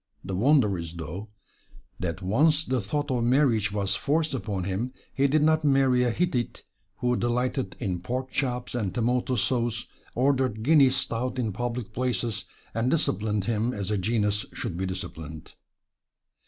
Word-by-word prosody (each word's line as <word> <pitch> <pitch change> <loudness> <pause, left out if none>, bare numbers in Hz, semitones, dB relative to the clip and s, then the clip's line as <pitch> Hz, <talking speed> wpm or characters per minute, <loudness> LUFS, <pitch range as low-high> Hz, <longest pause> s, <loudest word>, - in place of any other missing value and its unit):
The 95 - -5
wonder 105 - +3
is, 85 0 -6
though, 85 +6 -6 0.7
that 90 +1 -3
once 150 - +3
the 130 -2 0
thought 145 +8 -2
of 125 -2 +1
marriage 120 -5 +3
was 100 -1 0
forced 155 +6 +1
upon 105 -7 -2
him, 100 +7 -2 0.2
he 140 +1 +3
did 150 +2 +3
not 155 0 +3
marry 135 -3 +4
a 125 - +3
Hittite 125 -2 -1 0.4
who 125 0 +2
delighted 125 +3 -1
in 95 -7 -2
pork 130 +8 -3
chops 125 -3 -1
and 110 -6 -2
tomato 125 +2 +1
sauce, 115 +1 0 0.3
ordered 130 -4 +1
Guinness 135 -2 +6
Stout 125 +1 -1
in 115 -5 -1
public 120 -1 -3
places, 115 -5 -1 0.3
and 115 +3 +1
disciplined 105 - 0
him 115 +2 0
as 100 -1 -3
a 105 - +1
genius 105 0 +1
should - - -4
be 95 +2 -2
disciplined. 80 -4 -7
120 Hz, 155 wpm, -27 LUFS, 100-130 Hz, 0.7 s, Guinness